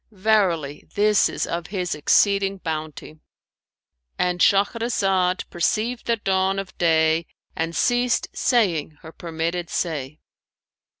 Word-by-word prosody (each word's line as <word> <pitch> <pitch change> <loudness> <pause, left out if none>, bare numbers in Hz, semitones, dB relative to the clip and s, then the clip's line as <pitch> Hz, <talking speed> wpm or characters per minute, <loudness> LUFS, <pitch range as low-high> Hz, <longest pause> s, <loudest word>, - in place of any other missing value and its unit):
Verily 185 -8 0
this 210 0 +3
is - - -2
of 170 -1 -4
His 185 -3 -3
exceeding 195 +5 +2
bounty!'"[FN#550]—And 155 - -7
Shahrazad 195 -3 +1
perceived 220 +7 -1
the 235 - +3
dawn 190 -2 0
of 195 -1 -6
day 160 -1 +2 0.3
and 165 +1 -3
ceased 245 -1 +1
saying 175 - +1
her 160 - -10
permitted 170 +1 -4
say. 150 -4 -3
180 Hz, 105 wpm, -23 LUFS, 160-200 Hz, 0.3 s, this